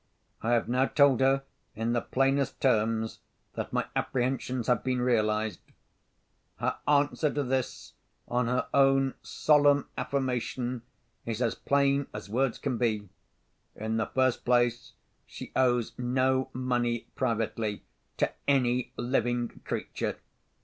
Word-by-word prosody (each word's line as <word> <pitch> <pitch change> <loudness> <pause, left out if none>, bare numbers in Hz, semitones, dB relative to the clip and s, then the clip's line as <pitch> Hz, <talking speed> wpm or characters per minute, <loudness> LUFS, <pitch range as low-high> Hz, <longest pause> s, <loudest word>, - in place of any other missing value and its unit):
I 115 +2 +1
have 115 - +2
now 130 +2 +2
told 140 -4 +4
her, 135 +1 +3 0.3
in 115 +2 -1
the 120 - +1
plainest 135 +2 0
terms, 110 -3 +1 0.3
that - - -4
my - - 0
apprehensions 125 -1 -1
have 125 -2 +2
been 130 -1 0
realised. 110 -4 +1 1.0
"Her - - -1
answer 145 +1 +2
to 145 - -1
this, 130 -1 -3 0.3
on 120 0 0
her 125 +1 0
own 135 -1 +4
solemn 145 -2 +3
affirmation, 125 -2 -2 0.4
is 115 -1 -3
as 120 -3 +1
plain 140 0 +1
as 105 -1 -7
words 130 +1 +1
can 130 -5 -2
be. 110 -4 0 0.7
In 110 +1 -2
the 110 - 0
first 130 -2 +1
place, 120 -1 +1 0.3
she - - -9
owes 125 -3 +2
no 130 +1 +1
money 120 -2 0
privately 115 -3 -1 0.3
to - - +1 0.2
any 125 -3 +2
living 120 -1 0 0.2
creature. - - -3
125 Hz, 130 wpm, -29 LUFS, 115-135 Hz, 1.0 s, told